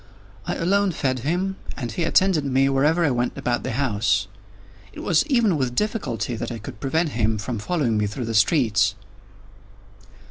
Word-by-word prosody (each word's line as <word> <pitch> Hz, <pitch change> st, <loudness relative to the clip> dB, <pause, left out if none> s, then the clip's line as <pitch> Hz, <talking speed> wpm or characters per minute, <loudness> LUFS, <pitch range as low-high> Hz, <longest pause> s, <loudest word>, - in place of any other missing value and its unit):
I -, -, -1 dB
alone 195 Hz, +2 st, +1 dB
fed 130 Hz, -4 st, -1 dB
him, 180 Hz, +8 st, -1 dB, 0.2 s
and 120 Hz, -4 st, -4 dB
he 165 Hz, +9 st, -2 dB
attended 185 Hz, -2 st, +3 dB
me 135 Hz, 0 st, +2 dB
wherever 150 Hz, +5 st, +2 dB
I 145 Hz, -, +2 dB
went 120 Hz, 0 st, -1 dB
about 120 Hz, -1 st, -1 dB
the -, -, -4 dB
house. 115 Hz, -5 st, +1 dB, 0.7 s
It -, -, -8 dB
was 165 Hz, -, +3 dB
even 235 Hz, -, +2 dB
with 125 Hz, -3 st, -1 dB
difficulty 130 Hz, -, -2 dB
that -, -, -4 dB
I 115 Hz, -, -4 dB
could 105 Hz, -1 st, -9 dB
prevent 160 Hz, +7 st, 0 dB
him 110 Hz, -4 st, 0 dB
from 110 Hz, +2 st, -4 dB
following 120 Hz, -4 st, 0 dB
me 105 Hz, -, +1 dB
through 115 Hz, +4 st, -5 dB
the 115 Hz, -, -3 dB
streets. 110 Hz, -, +3 dB
135 Hz, 175 wpm, -23 LUFS, 115-170 Hz, 0.7 s, attended